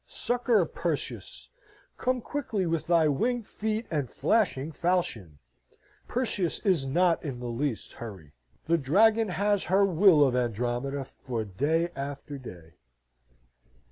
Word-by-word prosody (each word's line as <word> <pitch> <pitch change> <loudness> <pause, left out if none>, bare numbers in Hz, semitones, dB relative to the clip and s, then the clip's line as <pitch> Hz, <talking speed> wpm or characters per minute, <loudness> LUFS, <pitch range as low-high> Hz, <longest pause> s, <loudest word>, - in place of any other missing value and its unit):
Succour, 240 -6 +1
Perseus! 165 -1 -5 0.5
Come 255 0 -1
quickly 220 -8 -2
with 165 -2 -1
thy 170 -2 +4
winged 230 - 0
feet 220 +2 -3
and 145 -5 -1
flashing 165 -10 +1
falchion! 155 - -1 0.7
Perseus 210 -8 -1
is 170 -9 +2
not 170 +4 +2
in 135 -6 -5
the 125 - -6
least 120 0 -3
hurry. 95 -11 -9 0.3
The 165 +1 +2
dragon 215 +10 +4
has 205 +1 0
her 195 +4 +4
will 180 -4 +5
of 125 - -1
Andromeda 125 +3 -1
for 120 -3 -5
day 155 - 0
after 140 +1 -6
day. 85 -9 -11
160 Hz, 125 wpm, -28 LUFS, 130-200 Hz, 0.7 s, will